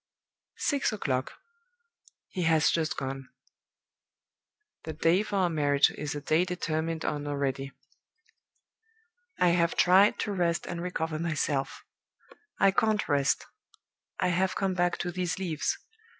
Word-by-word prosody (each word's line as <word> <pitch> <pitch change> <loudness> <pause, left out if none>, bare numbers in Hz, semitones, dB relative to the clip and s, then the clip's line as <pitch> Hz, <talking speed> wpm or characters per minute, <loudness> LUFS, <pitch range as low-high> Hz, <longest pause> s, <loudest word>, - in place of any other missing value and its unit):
Six 285 -3 0
o'clock. 130 -11 -2 1.0
He 185 - -4
has 160 -2 +3
just 165 +1 -1
gone. 135 0 -5 1.5
The 160 - -5
day 165 +5 +3
for 210 -1 -4
our 185 -3 +2
marriage 145 -3 +3
is 150 0 -5
a 145 - -4
day 155 +3 +2
determined 165 -3 -2
on 145 -1 -2
already. 140 -1 -2 1.7
"I 180 - +5
have 170 0 +2
tried 190 +3 +5
to 210 - -2
rest 175 -1 0
and 175 -1 -5
recover 165 -3 -3
myself. 150 -4 -2 0.7
I 195 - +5
can't 215 +1 +1
rest. 140 -1 +1 0.7
I - - +2
have 185 +2 +1
come 195 -1 0
back 175 -1 +1
to 175 - -3
these 180 -1 -2
leaves. 170 -5 -1
165 Hz, 130 wpm, -28 LUFS, 150-180 Hz, 1.7 s, I